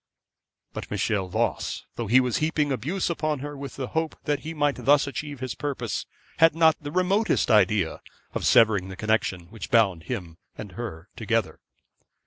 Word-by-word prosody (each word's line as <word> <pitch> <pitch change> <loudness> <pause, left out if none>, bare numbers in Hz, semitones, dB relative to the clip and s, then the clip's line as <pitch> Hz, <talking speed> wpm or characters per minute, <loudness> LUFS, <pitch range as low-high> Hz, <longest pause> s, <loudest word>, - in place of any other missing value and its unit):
But - - -6
Michel 100 -3 0
Voss, 90 - -2
though 115 - -4
he 120 +5 +6
was 125 -2 +1
heaping 155 -2 0
abuse 150 - -1
upon 155 -3 -1
her 145 +1 -6
with 140 -1 -7
the 130 -2 -4
hope 160 0 -1
that 145 -2 0
he 160 - -6
might 145 -2 0
thus 145 0 +5
achieve 145 -1 -6
his 130 -2 -3
purpose, 130 -7 -3 0.3
had 165 -1 +5
not 160 -1 +5
the 145 0 -6
remotest 185 - +2
idea 100 -4 +3 0.3
of - - -3
severing 105 -5 +4
the 95 - -7
connection 105 -4 0
which 110 - -7
bound 100 -9 +3
him 90 -9 -5 0.2
and 105 -3 -7
her 95 -4 -7
together. 115 -2 -1
130 Hz, 170 wpm, -26 LUFS, 105-150 Hz, 0.3 s, he